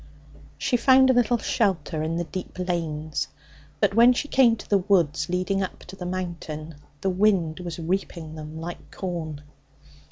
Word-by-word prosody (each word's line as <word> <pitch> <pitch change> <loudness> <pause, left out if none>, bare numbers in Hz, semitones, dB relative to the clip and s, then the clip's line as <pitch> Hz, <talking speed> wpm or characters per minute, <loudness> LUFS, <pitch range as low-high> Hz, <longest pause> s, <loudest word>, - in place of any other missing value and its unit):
She 245 - +1
found 260 +2 +6
a - - +3
little 245 -1 +3
shelter 190 -9 0
in 160 +1 -1
the 175 - 0
deep 185 +3 -7
lanes, 160 -4 -2 0.5
but - - +2
when 235 +3 +7
she 290 - -2
came 255 -5 +5
to 215 - -11
the 200 - +3
woods 175 -6 +2
leading 185 +2 0
up 190 - -4
to 185 - -11
the 180 -2 -6
Mountain 165 -4 -5 0.2
the 190 - +1
wind 185 -4 +2
was 175 -3 -5
reaping 170 -2 -3
them 155 0 -8
like 170 +2 -7
corn. 160 -6 -5
180 Hz, 165 wpm, -25 LUFS, 160-200 Hz, 0.5 s, when